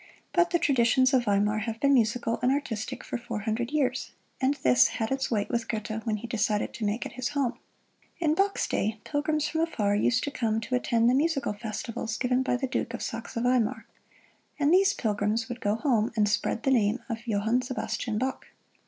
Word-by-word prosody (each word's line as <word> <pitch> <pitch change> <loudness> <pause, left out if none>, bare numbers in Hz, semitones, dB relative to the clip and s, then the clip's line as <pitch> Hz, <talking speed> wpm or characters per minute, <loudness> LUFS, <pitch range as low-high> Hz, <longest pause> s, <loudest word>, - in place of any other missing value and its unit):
But 345 -1 +4
the 345 - +2
traditions 260 -4 +3
of 250 -2 +3
Weimar 205 +1 +2
have 225 +1 -4
been 280 +2 +4
musical 230 -1 +1
and 250 +1 +3
artistic 240 -6 -3
for 245 - -4
four 235 -3 -5
hundred 225 +3 -2
years, 265 -4 -1 0.3
and 265 +2 +2
this 125 -1 +6
had 225 +1 -2
its 270 0 -1
weight 210 -3 0
with 235 -1 -1
Goethe 220 0 -3
when 215 -1 +1
he 210 - -8
decided 210 -2 0
to 220 - -4
make 210 +4 -1
it - - -6
his 255 0 -3
home. 265 -4 -1 0.6
In 315 -3 +2
Bach's 390 +4 +1
day, 215 +1 -1
pilgrims 305 +1 0
from 320 +1 -1
afar 215 -12 0
used 240 +4 +2
to 285 - -2
come 225 -6 0
to 225 +3 -6
attend 235 -2 +2
the 245 - +4
musical 280 -4 +1
festivals 220 +1 -4
given 250 0 +1
by 260 -1 0
the 265 - -2
Duke 260 - -2
of - - -6
Saxe - - -5
Weimar; 235 -2 +1 0.7
and 295 +2 +3
these 390 +2 +4
pilgrims 215 +1 0
would 245 0 -6
go 205 +1 +1
home 230 -4 +1
and 210 -2 +3
spread 215 +2 0
the 270 - +2
name 225 -1 +2
of 235 0 -5
Johann 220 +3 +1
Sebastian 245 -3 -3
Bach. 260 +3 -3
235 Hz, 205 wpm, -27 LUFS, 215-265 Hz, 0.7 s, this